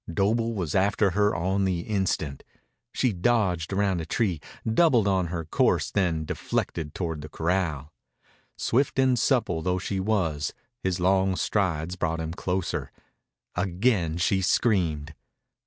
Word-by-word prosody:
Doble 115 Hz, +6 st, +1 dB
was 85 Hz, -7 st, -2 dB
after 100 Hz, +1 st, +2 dB
her 105 Hz, +3 st, +2 dB
on 95 Hz, +3 st, 0 dB
the 90 Hz, -3 st, 0 dB
instant. 85 Hz, -8 st, -1 dB, 0.5 s
She 125 Hz, -4 st, +1 dB
dodged 90 Hz, -4 st, +1 dB
round 95 Hz, -3 st, +1 dB
a -, -, -5 dB
tree, 95 Hz, -6 st, 0 dB, 0.2 s
doubled 115 Hz, -2 st, +4 dB
on 95 Hz, -3 st, +2 dB
her 85 Hz, -1 st, -4 dB
course, 75 Hz, -, +1 dB
then 85 Hz, -6 st, 0 dB
deflected 75 Hz, 0 st, -3 dB
toward 80 Hz, -4 st, -3 dB
the 75 Hz, -, -8 dB
corral. 80 Hz, -3 st, -1 dB, 0.6 s
Swift 130 Hz, +4 st, +1 dB
and 130 Hz, -2 st, +3 dB
supple 115 Hz, -, +1 dB
though 90 Hz, +2 st, 0 dB
she 95 Hz, +1 st, -2 dB
was, 90 Hz, -8 st, 0 dB, 0.3 s
his 95 Hz, -1 st, -1 dB
long 95 Hz, +1 st, +2 dB
strides 90 Hz, -4 st, 0 dB
brought 80 Hz, -2 st, -1 dB
him 80 Hz, 0 st, -3 dB
closer. 95 Hz, -1 st, -2 dB, 0.6 s
Again 90 Hz, -2 st, +1 dB
she 95 Hz, +3 st, +2 dB
screamed. 85 Hz, -6 st, +1 dB
95 Hz, 140 wpm, -26 LUFS, 80-100 Hz, 0.6 s, doubled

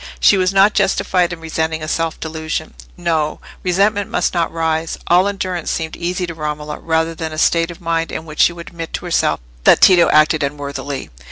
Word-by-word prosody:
She -, -, +6 dB
was 185 Hz, -1 st, +2 dB
not 195 Hz, +2 st, +5 dB
justified 185 Hz, -2 st, +1 dB
in 175 Hz, -, -6 dB
resenting 160 Hz, 0 st, -2 dB
a -, -, -4 dB
self 165 Hz, 0 st, -2 dB
delusion. 160 Hz, 0 st, -4 dB, 0.2 s
No! 160 Hz, -3 st, -1 dB, 0.2 s
resentment 200 Hz, +3 st, +1 dB
must -, -, 0 dB
not 170 Hz, -2 st, 0 dB
rise: 160 Hz, 0 st, -1 dB
all 180 Hz, +3 st, +4 dB
endurance 185 Hz, -4 st, -3 dB
seemed 160 Hz, -1 st, -3 dB
easy 180 Hz, +1 st, -2 dB
to 170 Hz, -, -6 dB
Romola 150 Hz, -1 st, -5 dB
rather 160 Hz, 0 st, 0 dB
than 160 Hz, 0 st, -5 dB
a 155 Hz, -, -7 dB
state 165 Hz, +1 st, +2 dB
of 175 Hz, -, -9 dB
mind 165 Hz, -1 st, -1 dB
in 160 Hz, -, -5 dB
which 155 Hz, -1 st, -10 dB
she -, -, +5 dB
would 170 Hz, -1 st, -9 dB
admit 165 Hz, -2 st, -8 dB
to -, -, -4 dB
herself 165 Hz, -, +1 dB, 0.2 s
that -, -, +6 dB
Tito 180 Hz, -3 st, +6 dB
acted 155 Hz, +1 st, +4 dB
unworthily. 140 Hz, -1 st, -4 dB
165 Hz, 195 wpm, -18 LUFS, 155-180 Hz, 0.2 s, She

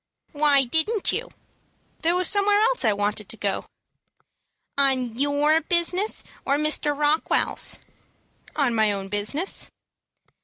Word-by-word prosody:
"Why 290 Hz, -2 st, +3 dB
didn't 320 Hz, -, 0 dB
you?" -, -, -4 dB, 0.7 s
"There 335 Hz, +2 st, +1 dB
was 365 Hz, 0 st, +2 dB
somewhere 410 Hz, 0 st, +3 dB
else 485 Hz, -, +1 dB
I 220 Hz, -, +3 dB
wanted 205 Hz, 0 st, -3 dB
to 225 Hz, -, -1 dB
go." 200 Hz, -1 st, -3 dB, 1.1 s
"On 260 Hz, -4 st, +1 dB
your 285 Hz, +3 st, +2 dB
own 320 Hz, -, +2 dB
business, 355 Hz, +4 st, +2 dB, 0.2 s
or 280 Hz, -, 0 dB
Mr. 300 Hz, -1 st, +1 dB
Rockwell's?" 300 Hz, +2 st, 0 dB, 0.8 s
"On 280 Hz, -5 st, +1 dB
my 220 Hz, -2 st, +2 dB
own 195 Hz, -1 st, -5 dB
business." 215 Hz, -, 0 dB
290 Hz, 125 wpm, -23 LUFS, 230-340 Hz, 1.1 s, Why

